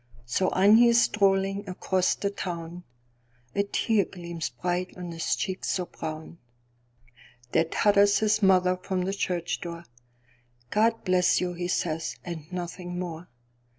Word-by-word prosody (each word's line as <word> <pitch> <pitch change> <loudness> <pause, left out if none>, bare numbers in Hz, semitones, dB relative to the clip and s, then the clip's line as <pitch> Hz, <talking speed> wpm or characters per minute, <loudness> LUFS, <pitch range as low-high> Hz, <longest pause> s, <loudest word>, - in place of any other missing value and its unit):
So 185 +10 +1
on 200 +4 +5
he 240 +1 +7
is 235 0 +5
strolling 195 -2 +1
across 185 0 0
the 200 - -2
town:A 120 -8 -7
tear 210 +1 +1
gleams 170 -4 -6
bright 180 +9 -3
on 175 -1 -6
his 165 0 -1
cheek 190 -1 -4
so 180 - -1
brown. 160 0 -7 1.1
There 160 - +3
totters 200 +3 +4
his 215 0 +2
mother 185 -2 +4
from 185 0 -2
the 190 +2 -2
church 180 -3 -2
door."God 120 - -4
bless 180 -1 +3
you!" 180 -1 -2
he 175 0 -4
says, 165 -2 -2
and 170 -2 -7
nothing 180 0 -5
more. 175 -1 -6
180 Hz, 135 wpm, -27 LUFS, 160-195 Hz, 1.1 s, he